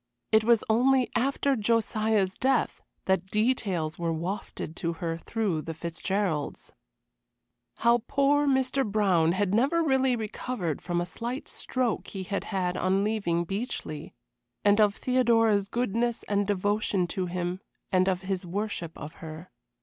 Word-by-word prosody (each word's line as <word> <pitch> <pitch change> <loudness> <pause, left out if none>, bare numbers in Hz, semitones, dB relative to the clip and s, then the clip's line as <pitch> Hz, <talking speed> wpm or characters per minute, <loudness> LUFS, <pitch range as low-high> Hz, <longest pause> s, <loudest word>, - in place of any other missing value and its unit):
It 220 0 +5
was 235 0 +4
only 255 +3 +3
after 275 +1 +1
Josiah's 215 -3 +1
death 260 -1 +1 0.2
that 190 -1 +1
details 200 -8 0
were 170 -1 0
wafted 170 -1 -4
to 170 0 -1
her 165 -1 -3
through 185 -1 -2
the 160 +2 -6
Fitzgeralds. 170 -1 -2 1.0
How 235 +1 +3
poor 285 +1 +3
Mr. 265 0 +2
Brown 195 -7 +2
had 195 0 0
never 280 +10 +3
really 265 -4 +3
recovered 215 - -3
from 175 -1 -1
a - - -1
slight 240 - -5
stroke 255 -4 -1
he 190 -2 -5
had 200 +2 -3
had 180 -3 -1
on 190 +2 +2
leaving 200 -6 0
Beechleigh, 195 - -4 0.6
and 205 +1 +5
of 205 -1 +4
Theodora's 225 -5 +2
goodness 235 0 -1
and 205 -1 0
devotion 205 -1 +1
to 185 0 -2
him, 180 +1 -3 0.3
and 185 0 +3
of 185 -1 -1
his 190 -1 -2
worship 180 -2 -4
of 150 +2 -8
her. 160 +2 -9
205 Hz, 140 wpm, -28 LUFS, 180-235 Hz, 1.0 s, It